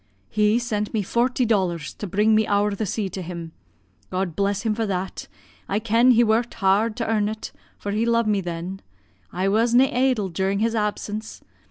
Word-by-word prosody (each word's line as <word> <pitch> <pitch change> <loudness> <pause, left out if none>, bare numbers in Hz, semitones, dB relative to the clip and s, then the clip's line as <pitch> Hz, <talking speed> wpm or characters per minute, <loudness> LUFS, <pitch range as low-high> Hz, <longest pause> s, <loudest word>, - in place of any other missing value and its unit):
'He 210 +1 +3
sent 220 -3 -2
me 210 - +1
forty 245 +5 +1
dollars 180 -9 0
to 205 - -6
bring 210 +4 +2
me 215 0 +3
ower 205 0 +2
the 205 +1 -3
sea 205 +2 -2
to 185 +1 -6
him 170 -2 -7 0.6
God 185 -3 -2
bless 200 0 0
him 220 -2 +1
for 225 0 -2
that, 190 -1 -4 0.4
I 200 - +1
ken 230 +3 +3
he 240 -1 +6
worked 230 +2 +1
hard 210 +2 +2
to 230 - -2
earn 210 -2 +1
it, 220 0 -6 0.3
for 205 - -4
he 215 +2 0
lo'ed 230 0 +2
me 210 -2 +1
then 175 +2 -5 0.5
I 185 +2 -1
was 230 +4 +2
na' 260 +1 +4
idle 250 -6 +2
during 190 +3 -1
his 225 +2 +1
absence. 210 0 -3
210 Hz, 195 wpm, -23 LUFS, 195-225 Hz, 0.6 s, he